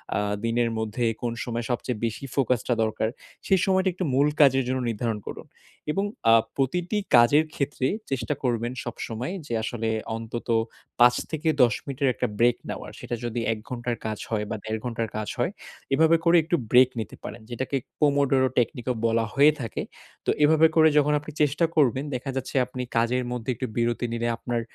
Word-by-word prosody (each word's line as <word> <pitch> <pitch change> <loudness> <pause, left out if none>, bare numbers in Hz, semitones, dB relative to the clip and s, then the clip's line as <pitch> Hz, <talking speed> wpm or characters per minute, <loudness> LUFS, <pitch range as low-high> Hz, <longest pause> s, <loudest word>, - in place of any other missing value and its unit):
আ - - +1 0.3
দিনের 115 0 +1
মধ্যে 110 +2 -2 0.2
কোন 120 -1 -1
সময় 120 -1 -3
সবচেয়ে 120 -1 -2
বেশি 115 +4 -4
ফোকাসটা 125 -3 +1
দরকার, 110 0 -1 0.4
সেই 190 -1 +4
সময়টা 190 0 +2
একটু 185 +1 -3
মূল 140 +3 +4
কাজের 135 -2 +5
জন্য 130 +1 0
নির্ধারণ 115 -1 -2
করুন। - - -7 0.5
এবং 195 +6 0 0.3
আ - - +8 0.2
প্রতিটি 175 - 0 0.2
কাজের 130 +6 +6
ক্ষেত্রে 140 -2 -1 0.2
চেষ্টা 135 +2 -1
করবেন 120 -1 0
সবসময় 120 +5 -5
যে, - - -4
আসলে 115 0 -2 0.3
অন্তত 115 +1 -6 0.5
৫ 120 0 +7 0.2
থেকে 155 0 -3 0.2
১০ 120 -3 +4
মিনিটের 140 -1 0
একটা - - -1
ব্রেক 120 0 +4
নেওয়ার - - -6
সেটা 120 - -4
যদি 120 0 -2
১ - - -7
ঘন্টার 120 -1 -3
কাজ 110 -1 -2
হয় 110 -2 0
বা - - -2
১.৫ 110 0 -3
ঘন্টার 115 -2 -2
কাজ 105 -1 -3
হয়। - - +1 0.4
এভাবে 160 +3 +5
করে 170 +1 +5
একটু 165 +3 0 0.2
ব্রেক 125 0 +7
নিতে 110 -6 -5
পারেন। 110 +3 -7
যেটাকে 130 +3 -2 0.2
কমোডোরো 140 -3 +3
টেকনিকও 125 +1 0
বলা 115 0 +1
হয়ে 145 +3 +6
থাকে। 115 - -4 0.4
তো - - -1
এভাবে 160 +2 +6
করে 160 -1 +7
যখন 150 0 +4
আপনি 150 +1 -9
চেষ্টা 150 +3 +3
করবেন, 135 -3 +3
দেখা 130 +2 -4
যাচ্ছে 130 +1 -4
আপনি 125 0 -6 0.2
কাজের 120 +2 +2
মধ্যে 125 0 -4
একটু 130 +3 -3
বিরতি 120 +1 0
নিলে 115 0 -1
আপনার 120 -1 -2
125 Hz, 180 wpm, -25 LUFS, 115-140 Hz, 0.5 s, আ